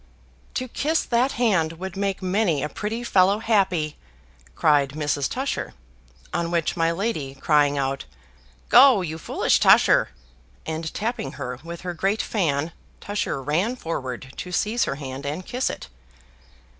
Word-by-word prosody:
"To 255 Hz, -, -2 dB
kiss 310 Hz, +6 st, 0 dB
that 245 Hz, +3 st, +1 dB
hand 190 Hz, -9 st, +2 dB
would 185 Hz, +2 st, -7 dB
make 195 Hz, -1 st, -2 dB
many 185 Hz, -6 st, +1 dB
a 150 Hz, -, -2 dB
pretty 220 Hz, +9 st, -4 dB
fellow 195 Hz, -3 st, +4 dB
happy!" 190 Hz, -9 st, +1 dB, 0.6 s
cried 145 Hz, -3 st, +3 dB
Mrs. 145 Hz, -2 st, -1 dB
Tusher: 270 Hz, +2 st, -3 dB, 0.6 s
on 170 Hz, 0 st, -1 dB
which 170 Hz, -2 st, 0 dB
my 165 Hz, -1 st, +2 dB
lady 170 Hz, -8 st, -2 dB
crying 145 Hz, 0 st, +2 dB
out, 135 Hz, 0 st, -2 dB, 0.6 s
"Go, 250 Hz, -6 st, +7 dB
you 160 Hz, -1 st, -5 dB
foolish -, -, +1 dB
Tusher!" -, -, +5 dB, 0.6 s
and 160 Hz, 0 st, -4 dB
tapping 215 Hz, -, -3 dB
her 125 Hz, -3 st, -5 dB
with 170 Hz, 0 st, -7 dB
her 180 Hz, -1 st, -4 dB
great 195 Hz, +5 st, 0 dB
fan, 160 Hz, -6 st, 0 dB, 0.3 s
Tusher 205 Hz, -9 st, -3 dB
ran 175 Hz, -, 0 dB
forward 130 Hz, -, -5 dB
to 180 Hz, -, -6 dB
seize 215 Hz, +6 st, +1 dB
her -, -, -2 dB
hand 135 Hz, -1 st, -7 dB
and 150 Hz, +6 st, -4 dB
kiss 250 Hz, +1 st, -1 dB
it. -, -, -7 dB
170 Hz, 145 wpm, -24 LUFS, 150-210 Hz, 0.6 s, Go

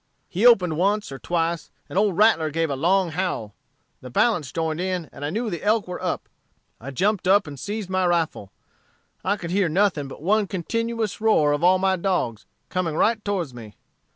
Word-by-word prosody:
He 200 Hz, +7 st, +3 dB
opened 180 Hz, -9 st, +4 dB
once 205 Hz, 0 st, +1 dB
or 135 Hz, -, -7 dB
twice, 170 Hz, -1 st, -1 dB, 0.2 s
and -, -, -10 dB
old 200 Hz, -2 st, +2 dB
Rattler 205 Hz, -8 st, +4 dB
gave 160 Hz, 0 st, -1 dB
a -, -, -1 dB
long 180 Hz, +6 st, +2 dB
howl; 155 Hz, -, -3 dB, 0.5 s
the 125 Hz, -, -9 dB
balance 160 Hz, -, +1 dB
joined 160 Hz, -1 st, -2 dB
in, 185 Hz, -3 st, -2 dB
and 145 Hz, -, -9 dB
I 145 Hz, -, -1 dB
knew 220 Hz, +6 st, -2 dB
the 170 Hz, -, -4 dB
elk 215 Hz, 0 st, +1 dB
were 180 Hz, -, -6 dB
up. 180 Hz, -1 st, -3 dB, 0.5 s
I 130 Hz, -, -8 dB
jumped 190 Hz, -, 0 dB
up 195 Hz, +1 st, +5 dB
and 140 Hz, -3 st, -9 dB
seized 210 Hz, +3 st, -4 dB
my 185 Hz, -1 st, +2 dB
rifle. 165 Hz, -, -1 dB, 0.7 s
I 200 Hz, +2 st, +1 dB
could 170 Hz, -3 st, -6 dB
hear 190 Hz, -2 st, +2 dB
nothing 175 Hz, -4 st, +1 dB
but 135 Hz, -, -11 dB
one 205 Hz, +3 st, +2 dB
continued 225 Hz, +3 st, -2 dB
roar 185 Hz, -10 st, +4 dB
of 145 Hz, +3 st, -1 dB
all 185 Hz, +1 st, +6 dB
my 190 Hz, 0 st, +1 dB
dogs, 170 Hz, -, -1 dB, 0.2 s
coming 180 Hz, -4 st, -2 dB
right 220 Hz, +4 st, +2 dB
towards 180 Hz, -9 st, -2 dB
me. 110 Hz, -3 st, -11 dB
180 Hz, 195 wpm, -24 LUFS, 155-205 Hz, 0.7 s, all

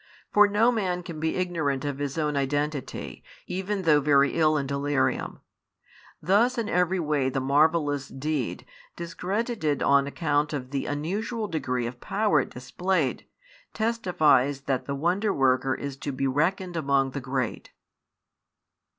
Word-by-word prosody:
For 210 Hz, 0 st, +7 dB
no 215 Hz, +4 st, +3 dB
man 185 Hz, -6 st, -1 dB
can 165 Hz, -3 st, -7 dB
be 160 Hz, +1 st, -1 dB
ignorant 160 Hz, -7 st, -1 dB
of 140 Hz, -1 st, -3 dB
his 145 Hz, +1 st, -3 dB
own 150 Hz, -2 st, 0 dB
identity, 145 Hz, +1 st, -2 dB, 0.2 s
even 190 Hz, +1 st, -3 dB
though 150 Hz, -3 st, +4 dB
very 140 Hz, -1 st, +4 dB
ill 155 Hz, -1 st, +3 dB
in 140 Hz, -, -1 dB
delirium. 140 Hz, 0 st, -1 dB, 0.8 s
Thus 220 Hz, -, +2 dB
in 230 Hz, -3 st, -1 dB
every 180 Hz, +1 st, +1 dB
way 150 Hz, -5 st, +1 dB
the 135 Hz, -, -1 dB
marvellous 145 Hz, 0 st, +2 dB
deed, 140 Hz, -2 st, -3 dB, 0.3 s
discredited 180 Hz, -, -2 dB
on 140 Hz, 0 st, +4 dB
account 150 Hz, 0 st, 0 dB
of 130 Hz, -3 st, -5 dB
the 140 Hz, -1 st, -2 dB
unusual 205 Hz, +10 st, -2 dB
degree 125 Hz, -8 st, -2 dB
of 120 Hz, +1 st, -7 dB
power 205 Hz, -6 st, +2 dB
it -, -, -6 dB
displayed, 150 Hz, +4 st, -2 dB, 0.5 s
testifies 155 Hz, -, +2 dB
that 135 Hz, -2 st, -2 dB
the 140 Hz, -, -3 dB
Wonder 180 Hz, +8 st, +1 dB
worker 130 Hz, -2 st, +2 dB
is 140 Hz, -1 st, -5 dB
to 145 Hz, -, -4 dB
be 135 Hz, +1 st, -2 dB
reckoned 175 Hz, +7 st, 0 dB
among 140 Hz, -4 st, +1 dB
the 140 Hz, -, -5 dB
great. 130 Hz, -3 st, -3 dB
150 Hz, 145 wpm, -26 LUFS, 140-180 Hz, 0.8 s, For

